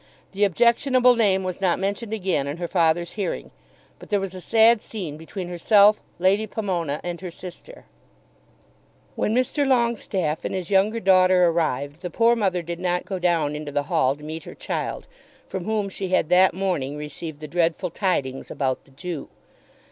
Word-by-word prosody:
The 200 +1 +2
objectionable 245 - +4
name 195 -5 +2
was 185 0 -4
not 180 -3 +2
mentioned 200 +3 -3
again 185 -10 -1
in 145 +3 -4
her 175 0 -3
father's 170 -1 +1
hearing, 205 -3 -4 0.5
but - - -13
there 205 - +2
was 195 -1 -4
a 185 - -8
sad 225 +3 +4
scene 180 -9 -6
between 175 +4 -7
herself, 205 +4 +4 0.2
Lady 195 +4 +2
Pomona, 175 -9 -2
and 175 0 -5
her 185 - -5
sister. 180 - -11 1.3
When 215 - 0
Mr. 255 +4 +1
Longestaffe 235 - 0
and - - -3
his 185 0 -4
younger 205 +4 +3
daughter 185 -2 +5
arrived, 155 -3 -1
the 180 - -4
poor 230 +6 +3
mother 190 -6 0
did 170 +1 -5
not 180 -1 -1
go 190 -2 -4
down 165 -4 +1
into 150 -1 -6
the 145 0 0
hall 130 +1 +3
to 150 - -16
meet 160 +1 -6
her - - -10
child, - - -4 0.4
from 190 -2 -5
whom 215 -2 0
she 190 -1 -4
had 175 -3 +1
that 180 0 +5
morning 175 -8 -2
received 150 +1 -7
the 155 - -7
dreadful 170 +2 0
tidings 140 -9 -2
about 130 -2 -2
the - - -22
Jew. 155 +3 -6
180 Hz, 180 wpm, -23 LUFS, 165-205 Hz, 1.3 s, daughter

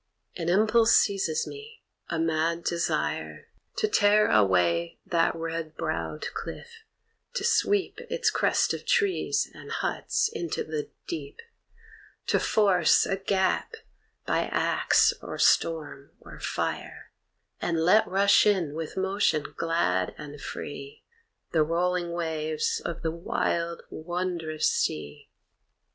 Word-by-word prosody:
An 170 -1 -2
impulse 220 +4 +4
seizes 195 -6 +2
me, 440 +2 -11 0.3
a 165 - -2
mad 165 +1 0
desire 170 -1 -2 0.3
To 430 - +1
tear 210 - +4
away 90 -4 +2
that 165 -1 +1
red 165 -1 -4
browed - - -3
cliff, 460 -1 -8 0.5
to - - -1
sweep 410 -3 +1
Its 475 -2 +1
crest - - +2
of - - -5
trees 430 -6 +1
and - - -12
huts 480 - 0
into 350 -7 -3
the 155 -1 -4 0.2
deep; 145 -4 -6 0.9
To - - +2
force 200 -4 +3
a 195 - 0
gap 195 - 0 0.5
by - - +1
axe, - - +3
or - - -6
storm, 155 -4 +1
or - - -13
fire, - - -4 0.5
And 170 -1 0
let 210 +5 +5
rush 200 +2 +4
in 180 -8 +1
with 160 +2 -6
motion 190 -5 0
glad 95 - 0
and 145 -1 -9
free 140 -1 -7 0.5
The 160 - +3
rolling 175 +2 0
waves 160 -2 -2
of 170 0 -5
the 160 - 0
wild 170 0 -2
wondrous 170 -2 -2
sea. 75 -1 -2
170 Hz, 120 wpm, -27 LUFS, 155-205 Hz, 0.9 s, let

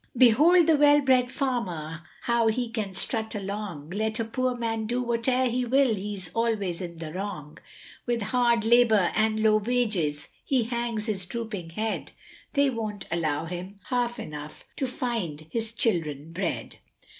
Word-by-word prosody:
Behold 300 +9 +6
the 320 -1 +4
well 290 0 +6
bred 255 -3 +3
farmer, 180 - -2 0.2
how 235 -1 +2
he 230 +1 0
can 210 -4 -3
strut 220 +1 -1
along, 195 -6 -5
Let 220 +3 -1
a 230 - 0
poor 255 +2 -1
man 225 -2 -2
do 245 +2 0
whatever 245 +2 +1
he 250 +1 0
will 260 0 +3
he's 195 -4 -5
always 210 -6 0
in 170 -2 -6
the 160 -1 -7
wrong, 180 -6 -6 0.5
With 235 -2 0
hard 235 -2 +3
labour 225 -5 +5
and 220 0 +2
low 215 0 +5
wages 210 -10 0
he 260 -4 +2
hangs 235 -2 -2
his 195 -5 -2
drooping 215 -6 -5
head, 220 0 -2 0.4
They 280 -2 +3
won't 215 -4 -4
allow 160 -2 0
him 180 +4 -7
half 240 -1 0
enough 150 0 -8
to 265 - 0
find 225 - -3
his 225 -1 -2
children 165 - -1
bread. 180 0 -3
220 Hz, 155 wpm, -27 LUFS, 185-240 Hz, 0.5 s, Behold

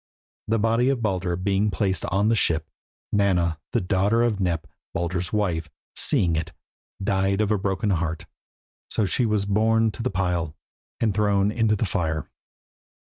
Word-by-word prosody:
The 115 - +2
body 115 +4 +2
of 130 -4 0
Baldur 95 -4 0
being 100 +3 +1
placed 95 -3 -1
on 100 +3 +1
the 115 - +4
ship, 80 -6 +1 0.5
Nanna, 90 -6 +2
the - - +1
daughter 100 +5 +2
of 115 -4 +1
Nep, 85 -4 0 0.3
Baldur's 85 +1 -1
wife, 85 -7 0 0.3
seeing 85 -3 +1
it, 80 0 -3 0.5
died 95 0 +1
of 105 -1 +1
a 105 - +3
broken 100 +1 0
heart, 80 -3 -1 0.6
so 110 - 0
she 120 +5 +1
was 105 -2 +1
borne 110 +2 +3
to 110 - -8
the 125 - 0
pile 90 -5 -1 0.4
and 110 -3 +1
thrown 100 -1 +2
into 110 -1 +2
the 110 - 0
fire. 80 -4 -1
100 Hz, 160 wpm, -24 LUFS, 90-105 Hz, 0.6 s, the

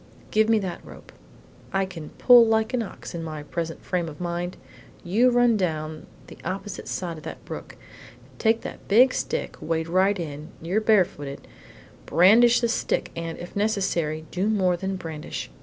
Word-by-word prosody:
Give 220 +1 +3
me 225 - +5
that 185 -4 -4
rope. - - -13 0.6
I 195 0 +1
can 165 -5 -8
pull 245 -1 +8
like 220 +1 +1
an 250 - +1
ox 210 - -8
in 170 - -4
my 155 -2 -6
present 165 +2 -5
frame 175 -3 -1
of 150 - -11
mind. 175 0 -3 0.5
You 220 +8 +3
run 245 -2 +4
down 160 -5 -1
on 155 - -10 0.2
the - - -13
opposite 190 +3 -5
side 170 -3 -4
of - - -16
the - - -6
brook, - - -8 0.6
take 225 0 +2
that - - -9
big 250 +6 +6
stick - - -3
wade 160 0 -1
right 190 +4 +3
in 150 -2 -6
you 175 +5 -2
are - - +3
barefooted, 185 -10 +1 0.6
brandish 225 +10 +6
the 235 - +2
stick, 230 - -1
and, 165 0 -4
if 175 - -9
necessary, 180 -7 0
do 190 +4 0
more 185 -4 +2
than 190 +2 -3
brandish. 160 - -6
185 Hz, 175 wpm, -25 LUFS, 165-220 Hz, 0.6 s, pull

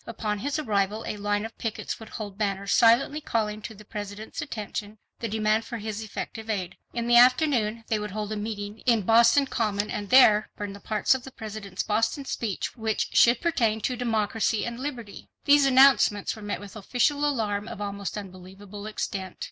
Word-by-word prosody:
Upon 215 -2 -3
his 285 +6 -2
arrival 215 -5 -1
a - - -3
line 205 +1 -1
of 225 - -8
pickets 225 -2 -4
would 220 - -11
hold 205 -3 -7
banners 200 -1 -2
silently 245 +6 +4
calling 215 -5 -2
to 220 0 -8
the 215 +1 -14
President's 210 0 -6
attention 215 -5 -5 0.2
the 230 - -2
demand 215 +1 +1
for 235 - -6
his 215 0 -5
effective 220 +1 -6
aid. 185 -4 -2 0.2
In 235 -1 -3
the 240 0 +5
afternoon 245 -3 +4
they 220 -1 0
would 210 0 -4
hold 210 +1 -4
a - - -1
meeting 210 0 -5
in 230 -4 +4
Boston 235 +6 +5
Common 210 -5 -1
and 205 -1 -4
there 215 -5 +6
burn 205 -2 -5
the 200 - -10
parts 215 +3 +1
of 260 -2 -4
the 265 - -8
President's 215 -5 -6
Boston 225 +6 0
speech 220 -7 -3
which 220 -2 -1
should 235 0 +5
pertain 230 -10 +1
to 250 - -1
democracy 225 -2 0
and 235 0 -5
liberty. 250 -7 -7 0.2
These 285 -1 +6
announcements 260 -6 +5
were 220 - -11
met 205 -1 -3
with 205 0 -11
official 250 +7 0
alarm 220 -7 0
of - - -7
almost 200 0 -4
unbelievable 195 +1 -9
extent. 195 -3 -4
215 Hz, 190 wpm, -26 LUFS, 205-235 Hz, 0.2 s, there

